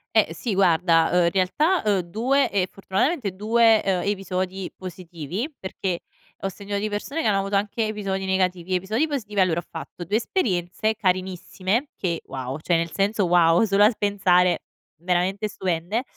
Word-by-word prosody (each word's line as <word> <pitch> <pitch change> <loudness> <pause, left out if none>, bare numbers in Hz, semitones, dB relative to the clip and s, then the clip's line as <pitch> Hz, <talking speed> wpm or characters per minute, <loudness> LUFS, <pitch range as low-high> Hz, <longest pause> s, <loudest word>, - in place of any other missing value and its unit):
Eh, - - +3
sì, 230 -5 -3
guarda, 170 -3 +4
uhm 180 -1 +4
in 170 - +2
realtà, 295 - +1
ehm, 205 -3 +2
2 235 +11 +1
ehm, 190 -3 +1
fortunatamente 200 - -1
2, 225 +1 +4
ehm, 185 -2 +1
episodi 190 -1 -2
positivi, 180 - -6
perché 190 -2 -4 0.4
ho 195 - 0
sentito 200 +1 -5
di 210 +1 -1
persone 275 +10 -3
che - - +1
hanno 200 -2 +3
avuto 195 +1 -2
anche 210 +3 0
episodi 195 -3 -3
negativi. 185 -1 0
Episodi 215 - 0
positivi: 215 -9 -4
allora 175 -3 +2
ho - - -15
fatto - - -8
2 200 +5 0
esperienze 215 - 0
carinissime 185 - -1
che 170 -3 -2
wow 130 +1 -5
cioè, 170 +3 0
nel 165 0 -1
senso 200 0 +1
wow 170 +1 +4
solo 205 -1 +4
al 215 +1 +4
pensare 185 -3 +2 0.3
veramente 180 +4 0
stupende. 190 +2 -2
190 Hz, 165 wpm, -24 LUFS, 180-210 Hz, 0.4 s, guarda